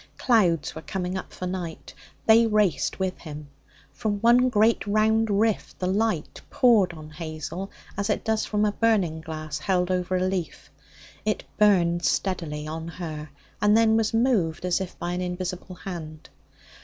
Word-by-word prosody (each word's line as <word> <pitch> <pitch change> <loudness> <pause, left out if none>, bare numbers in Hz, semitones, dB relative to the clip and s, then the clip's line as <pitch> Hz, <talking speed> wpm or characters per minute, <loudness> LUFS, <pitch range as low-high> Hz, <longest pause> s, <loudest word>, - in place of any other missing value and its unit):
Clouds 180 - +2
were 160 - -7
coming 180 +1 -3
up 190 - -5
for 185 - -6
night. 180 -3 -5 0.3
They 225 +1 +6
raced 210 -7 +1
with 190 -1 -2
him. 150 -2 -9 0.4
From 205 +9 -2
one 240 +3 +5
great 220 -1 +2
round 220 +2 +2
rift 210 +1 0
the 185 - -3
light 195 -3 -1
poured 220 -8 +4
on 155 -2 -11
Hazel 155 +4 -6 0.3
as 200 +1 -2
it - - -1
does 220 -1 +1
from 210 0 0
a 210 - +2
burning 200 -8 +1
glass 155 -1 -5
held 180 +1 0
over 180 0 0
a 185 - +1
leaf. 185 -3 -4 0.5
It 215 - -1 0.2
burned 175 -5 +4
steadily 160 -6 -1
on 160 +1 -5
her, 155 -3 -6 0.3
and 210 +1 +5
then 225 -1 +4
was 220 -1 +2
moved, 220 -9 +1
as 180 +1 +1
if 185 - -6
by 175 0 -3
an 180 +1 -2
invisible 180 0 -4
hand. 160 -5 -8
185 Hz, 165 wpm, -25 LUFS, 165-215 Hz, 0.5 s, They